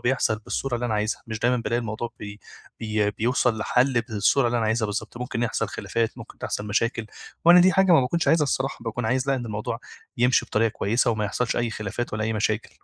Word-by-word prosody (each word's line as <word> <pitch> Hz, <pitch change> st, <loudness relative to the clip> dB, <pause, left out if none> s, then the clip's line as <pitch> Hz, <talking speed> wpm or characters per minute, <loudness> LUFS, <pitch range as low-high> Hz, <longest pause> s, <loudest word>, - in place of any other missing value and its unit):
بيحصل 120 Hz, -3 st, +1 dB
بالصورة 120 Hz, +4 st, -3 dB
اللي 120 Hz, +1 st, -1 dB
أنا 110 Hz, -, -1 dB
عايزها، 105 Hz, +1 st, -1 dB
مش 110 Hz, -1 st, -4 dB
دايمًا 125 Hz, +2 st, +2 dB
بالاقي 115 Hz, +1 st, -1 dB
الموضوع 115 Hz, +1 st, -4 dB
بي 105 Hz, 0 st, -8 dB, 0.4 s
بي 105 Hz, -2 st, 0 dB
بيوصل 120 Hz, +1 st, +1 dB
لحَل 125 Hz, +3 st, +2 dB
بالصورة 115 Hz, +3 st, +2 dB
اللي 120 Hz, 0 st, +1 dB
أنا 110 Hz, -, 0 dB
عايزها 110 Hz, 0 st, +1 dB
بالضبط، 105 Hz, +3 st, -5 dB
ممكن 120 Hz, -1 st, -3 dB
يحصل 120 Hz, -, -1 dB
خلافات، 115 Hz, -1 st, -2 dB
ممكن -, -, -12 dB
تحصل 105 Hz, -, -4 dB
مشاكل، 115 Hz, +2 st, 0 dB, 0.4 s
وأنا 175 Hz, +1 st, +8 dB
دي 185 Hz, +1 st, +5 dB
حاجة 190 Hz, 0 st, +4 dB
ما 160 Hz, -, +7 dB
باكنش 160 Hz, +6 st, 0 dB
عايزها 160 Hz, -2 st, +4 dB
الصراحة، 135 Hz, -1 st, -1 dB
باكون 115 Hz, +1 st, -4 dB
عايز 130 Hz, +4 st, 0 dB
لأ 135 Hz, -, +3 dB
إن 125 Hz, -3 st, -4 dB
الموضوع 110 Hz, +2 st, -4 dB, 0.4 s
يمشي 125 Hz, +1 st, +3 dB
بطريقة 115 Hz, +1 st, +2 dB
كويسة 115 Hz, +4 st, +1 dB
وما 110 Hz, -1 st, -1 dB
يحصلش 120 Hz, +4 st, -1 dB
أي 120 Hz, -1 st, 0 dB
خلافات 110 Hz, +2 st, -4 dB
ولا 110 Hz, +1 st, -1 dB
أي 110 Hz, -, -1 dB
مشاكل. 110 Hz, +1 st, -1 dB
115 Hz, 215 wpm, -24 LUFS, 110-125 Hz, 0.4 s, وأنا